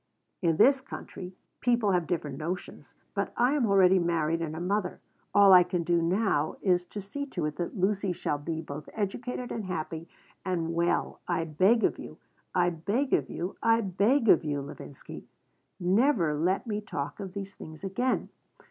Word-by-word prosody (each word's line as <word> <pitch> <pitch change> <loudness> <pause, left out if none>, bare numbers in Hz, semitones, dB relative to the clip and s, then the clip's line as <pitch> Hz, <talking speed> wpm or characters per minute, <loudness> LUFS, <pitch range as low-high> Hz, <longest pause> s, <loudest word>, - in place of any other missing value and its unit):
In 165 -3 +2
this 270 +6 +5
country 185 -7 -8 0.2
people 235 -4 +2
have 180 -3 +1
different 150 -6 -3
notions. 175 +4 -6 0.2
But - - -2
I 245 +3 +3
am 275 -6 +2
already 190 -2 +5
married 165 -1 0
and 160 -1 -3
a - - -5
mother. 185 +1 -1 0.3
All 200 -1 +7
I 180 - +10
can 175 -1 -1
do 170 0 +2
now 170 -3 +1
is 180 -2 +2
to 205 +3 -7
see 280 +9 -5
to 175 - -3
it 150 -1 -3
that 175 +4 -4
Lucy 195 0 +1
shall 150 -4 -2
be 160 +2 -4
both 150 -1 -8
educated 240 +4 -3
and 220 -3 -4
happy, 165 -2 -4 0.4
and, 170 -3 -1
well, 170 +1 0
I - - 0
beg 185 +9 +3
of - - +1
you, - - -9 0.4
I 175 -1 +3
beg 205 - -1
of - - +2
you, 180 +3 -4
I 230 0 +4
beg 215 +6 +2
of 175 - +6
you, 145 -2 -2
Levinsky, 140 -1 -10 0.5
never 185 - +3
let 180 +9 0
me 210 -2 -2
talk 145 -8 -5
of 190 -2 -6
these 200 0 -6
things 155 +1 -11
again. 245 +7 -1
180 Hz, 180 wpm, -28 LUFS, 165-210 Hz, 0.5 s, I